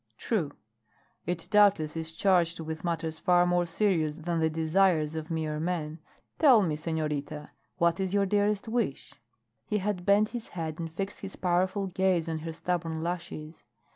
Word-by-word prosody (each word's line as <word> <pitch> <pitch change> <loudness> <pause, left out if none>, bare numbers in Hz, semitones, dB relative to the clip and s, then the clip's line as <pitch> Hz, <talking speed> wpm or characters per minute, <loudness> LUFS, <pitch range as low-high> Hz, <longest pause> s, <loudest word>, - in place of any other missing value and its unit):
"True. 190 -11 -1 0.8
It 175 -1 -2
doubtless 200 -7 +4
is 160 0 -3
charged 170 -1 +2
with 160 0 -5
matters 165 -2 -2
far 175 0 +4
more 175 0 +1
serious 165 -4 +1
than 170 0 -2
the 160 0 +2
desires 160 0 +2
of 160 0 -5
mere 155 -2 -2
men. 160 -2 -3 0.4
Tell 260 -9 +7
me, 160 -4 0
senorita, 150 -2 -3 0.3
what 170 0 +2
is 190 -1 -1
your 200 0 +2
dearest 205 +1 +1
wish?" 225 - -2 0.5
He 210 - 0
had 200 -2 -2
bent 205 +3 +4
his 240 -2 -6
head 160 -1 -4
and 165 -1 -4
fixed 195 +4 -5
his 195 -1 -7
powerful 185 +2 +1
gaze 185 -2 +1
on 160 -1 -2
her 165 +1 -5
stubborn 165 -1 -2
lashes. 170 -2 -5
170 Hz, 165 wpm, -29 LUFS, 160-190 Hz, 0.8 s, Tell